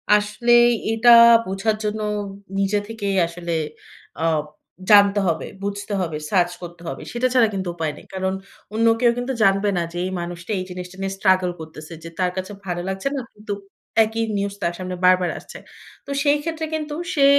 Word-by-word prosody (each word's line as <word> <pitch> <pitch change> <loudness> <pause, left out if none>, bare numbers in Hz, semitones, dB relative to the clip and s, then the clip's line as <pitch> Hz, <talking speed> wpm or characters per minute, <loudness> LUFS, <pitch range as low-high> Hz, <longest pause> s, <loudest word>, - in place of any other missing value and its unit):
আসলেই 240 +3 +4 0.3
এটা 230 +2 +4 0.4
বোঝার 195 +3 0
জন্য 210 +1 -2 0.6
নিজে 195 +1 +2
থেকেই 205 -3 -2
আসলে 170 0 -5 0.7
অ - - 0 0.7
জানতে 205 -1 +7
হবে, 165 -2 0 0.2
বুঝতে 205 +1 -4
হবে, 160 -4 -2
সার্চ 175 -3 +2
করতে 175 -1 -9
হবে। - - -5
সেটা 240 +2 +1
ছাড়া 245 -3 +5
কিন্তু 190 -2 -3
উপায় 160 -3 -2
নেই। - - -14
কারণ 190 0 -1 0.4
অন্য 230 +1 +2
কেউ 240 -1 +5
কিন্তু 245 +2 -2
জানবে 195 +1 +3
না 175 - +1
যে, - - -5
এই 185 - -3
মানুষটা 175 +3 -6
এই - - -2
জিনিসটা 180 0 -8
নিয়ে 195 0 -2
স্ট্রাগল 185 -2 +3
করতেছে। 155 0 -9
যে, 165 - -7
তার 180 -1 +2
কাছে 185 +2 -4
ভালো 175 -1 -2
লাগছে 190 +5 -3
না। 275 - -2
কিন্তু 210 0 -5 0.5
একই 225 +1 -2
নিউজ 200 0 -2
তার 170 - 0
সামনে 185 0 -4
বারবার 180 -1 +5
আসছে। - - -11 0.5
তো 280 - -7
সেই 290 0 +4
ক্ষেত্রে 320 -1 -3
কিন্তু 300 -1 -4 0.2
সে 280 -4 +4
195 Hz, 180 wpm, -22 LUFS, 180-225 Hz, 0.7 s, জানতে